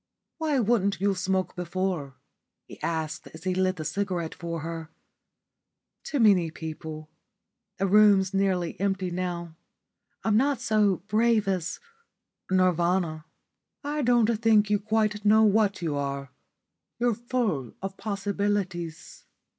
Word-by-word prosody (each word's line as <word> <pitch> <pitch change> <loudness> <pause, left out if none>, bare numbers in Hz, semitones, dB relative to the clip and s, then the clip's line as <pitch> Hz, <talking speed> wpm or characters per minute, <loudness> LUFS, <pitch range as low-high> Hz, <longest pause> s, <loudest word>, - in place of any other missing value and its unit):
"Why 305 -4 +1
wouldn't 205 -4 +1
you 200 +1 +2
smoke 190 0 -1
before?" 180 -5 -3 0.5
he - - -13
asked 160 -1 -3
as 160 - -11
he 185 0 0
lit 185 0 +1
the 155 -3 -6
cigarette 180 -4 -2
for 170 -2 -5
her. 165 0 -6 1.1
"Too 285 - -2
many 195 -7 +5
people. 155 -1 -7 0.7
The 195 - 0
room's 200 -1 +5
nearly 190 -3 0
empty 195 -2 -1
now. 175 -2 -4 0.7
I'm 220 -2 +2
not 270 +2 +2
so 210 -6 +2
brave 220 -1 +2
as 185 -3 -1 0.7
Nirvana." 175 -3 +1 0.6
"I 295 +1 -2
don't 235 -3 +3
think 215 -2 +4
you 205 - +3
quite 215 0 0
know 215 +1 +5
what 205 -3 +2
you 155 -3 -1
are. 140 -1 -3 0.7
You're 240 0 +2
full 220 - -2
of 195 0 -4
possibilities." 200 -5 -3
190 Hz, 125 wpm, -27 LUFS, 170-215 Hz, 1.1 s, many